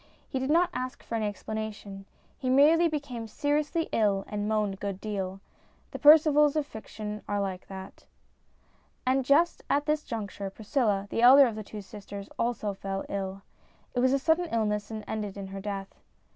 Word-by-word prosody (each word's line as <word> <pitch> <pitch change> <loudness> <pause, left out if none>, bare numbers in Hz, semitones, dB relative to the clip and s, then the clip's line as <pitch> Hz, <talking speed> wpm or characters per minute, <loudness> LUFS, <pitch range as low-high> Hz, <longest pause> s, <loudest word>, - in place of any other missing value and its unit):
He 265 - -2
did 265 +1 -2
not 340 +3 +3
ask 255 0 -5
for - - -8
any 220 -2 0
explanation. 205 -1 -6 0.3
He 255 - -2
merely 305 +6 +6
became 280 -7 -4
seriously 295 +7 0
ill 200 -3 +2
and 210 0 -3
moaned 210 -2 +1
a - - -9
good 195 -1 -4
deal. 195 -2 -4 0.5
The - - -6
Percivals 300 -1 +6
of 305 -2 +1
fiction 215 -3 -7
are 205 0 0
like 190 -2 -3
that. 190 0 -10 1.0
And 260 +1 +2
just 300 +7 +3
at 290 +1 +2
this 305 0 +1
juncture 205 -4 -5
Priscilla, 210 -1 0
the - - 0
elder 270 +3 +9
of 235 - -1
the 215 0 -6
two 210 +1 -8
sisters, 200 0 -9
also 230 -3 -1
fell 195 0 -4
ill. 195 0 -4 0.5
It 245 - 0
was 255 +1 +4
a 275 - +4
sudden 320 +5 +2
illness, 210 -2 0
and 220 -1 -6
ended 210 -2 -4
in 200 - -5
her 195 0 -6
death. 195 -1 -5
220 Hz, 180 wpm, -28 LUFS, 200-275 Hz, 1.0 s, elder